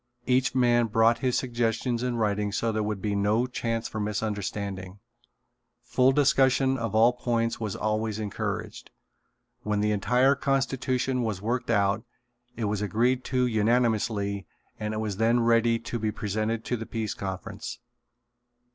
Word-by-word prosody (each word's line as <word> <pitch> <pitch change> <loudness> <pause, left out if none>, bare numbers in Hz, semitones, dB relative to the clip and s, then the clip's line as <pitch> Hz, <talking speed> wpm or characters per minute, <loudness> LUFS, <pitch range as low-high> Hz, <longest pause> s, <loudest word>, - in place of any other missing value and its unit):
Each 130 0 +2
man 120 -2 +3
brought 115 +2 +3
his 130 -2 +1
suggestions 120 -1 -1
in 125 -1 -1
writing 105 -2 0
so 115 +3 0
there 110 0 -1
would 105 -2 -3
be 105 -1 0
no 105 +4 +2
chance 115 -2 -2
for 110 - -5
misunderstanding. 100 -2 -3 0.9
Full 130 +1 +3
discussion 135 -1 +3
of 115 -4 -3
all 115 +3 +5
points 115 -2 -1
was 110 -3 -3
always 110 0 -1
encouraged. 105 -2 -4 0.7
When 105 -1 -1
the 105 +1 +1
entire 125 +6 +3
constitution 135 -2 0
was 110 -5 -2
worked 120 +5 -2
out 100 -1 +2 0.5
it 115 - -1
was 105 0 -1
agreed 120 +5 +1
to 125 -1 +1
unanimously 110 -3 +1 0.3
and 105 0 -3
it - - -2
was 105 -3 -3
then 115 +2 +3
ready 115 0 +3
to 115 +1 -5
be 110 0 -1
presented 110 +2 -2
to 125 - -1
the 115 - -7
Peace 110 -2 -3
Conference. 100 +4 -6
115 Hz, 150 wpm, -27 LUFS, 105-125 Hz, 0.9 s, all